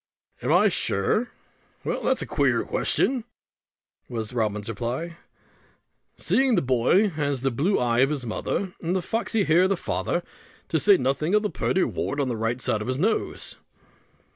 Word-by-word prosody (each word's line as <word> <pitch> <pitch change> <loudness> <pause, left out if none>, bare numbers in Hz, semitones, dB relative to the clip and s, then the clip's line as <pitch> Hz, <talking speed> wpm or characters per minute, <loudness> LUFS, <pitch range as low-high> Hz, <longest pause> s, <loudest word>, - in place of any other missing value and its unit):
"Am - - 0
I - - +5
sure? 155 - 0 0.5
Well, - - -2
that's - - +1
a - - -5
queer - - +1
question," 255 -3 0 0.9
was 115 -1 -4
Robin's 105 -3 -1
reply; 125 +10 -4 1.0
"seeing 265 -2 +2
the 175 - +2
boy 130 - +3
has 145 -6 -2
the 135 0 +1
blue 160 - +1
eye 120 -1 +1
of 140 +3 +3
the - - -8
mother, 180 - -2
with 175 +2 -1
the 185 - 0
foxy 225 0 0
hair 165 +1 +4
of - - +1
the 195 - +1
father; 175 0 -2 0.5
to 160 - +1
say 200 +4 +6
nothing 140 +8 0
of 210 - +3
the 210 - -1
purty 190 - +1
wart 145 - -2
on 135 -2 0
the 120 - -1
right 115 +2 -1
side 110 -4 -1
of 105 - -5
his 130 0 -1
little 215 +9 +1
nose." - - -7
145 Hz, 180 wpm, -25 LUFS, 120-190 Hz, 1.0 s, say